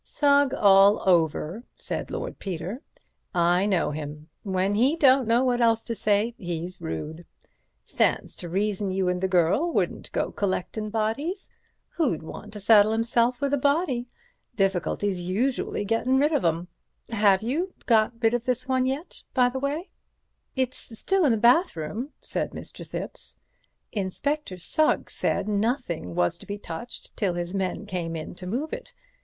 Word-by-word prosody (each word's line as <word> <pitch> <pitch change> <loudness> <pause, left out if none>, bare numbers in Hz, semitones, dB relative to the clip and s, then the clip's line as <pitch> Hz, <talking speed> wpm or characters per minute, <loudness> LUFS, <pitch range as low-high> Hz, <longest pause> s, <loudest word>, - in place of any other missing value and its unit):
"Sugg 285 -2 +3
all 200 0 +5
over," 170 +3 +2
said - - -4
Lord - - -5
Peter, 190 - -5 0.5
"I 175 +3 +3
know 180 -7 +1
him. 150 +1 -7
When 190 0 0
he 255 +9 +3
don't 270 -5 +5
know 235 +2 +4
what 245 -1 +1
else 230 -1 +3
to 230 - -3
say, 210 +2 +1
he's 175 0 -5
rude, 150 - -5 0.6
Stands - - 0
to 175 - -7
reason 200 +2 0
you 190 -1 0
and 180 0 -1
the 190 - +2
girl 185 - +2
wouldn't - - -1
go - - -1
collectin' 205 +2 -2
bodies. 230 - -2 0.4
Who'd 280 - 0
want 210 +6 -9
to 210 - -7
saddle 210 +1 +6
himself 235 +2 +1
with 280 0 0
a 285 - +2
body? 280 -3 +1 0.5
Difficulty's 195 -2 0
usually 245 +7 0
to - - -3
get 225 +2 0
rid 275 +4 +3
of 290 - +1
'em. 170 +1 0 0.4
Have 205 -3 +3
you 330 +11 -2
got 220 -2 +4
rid 225 +1 +4
of 240 -1 -1
this 255 0 -1
one 260 -1 +2
yet, 275 +6 -4
by 250 -2 +5
the 265 +1 -4
way?" 290 +7 -2 0.7
"It's 255 -3 -3
still 385 - +2
in 275 - +4
the 225 - +2
bathroom," 235 - +2
said - - -2
Mr. - - -8
Thipps. - - -6 0.6
"Inspector 210 +4 -2
Sugg 310 - +1
said - - -1
nothing 205 - -1
was 90 0 +1
to - - -13
be 205 - -4
touched 170 +4 -9
till 195 -6 0
his 175 +1 -3
men 195 +1 -2
came 175 -4 -3
in 155 -1 -6
to 180 0 -9
move 265 +11 -3
it. - - -7
215 Hz, 165 wpm, -26 LUFS, 185-255 Hz, 0.7 s, saddle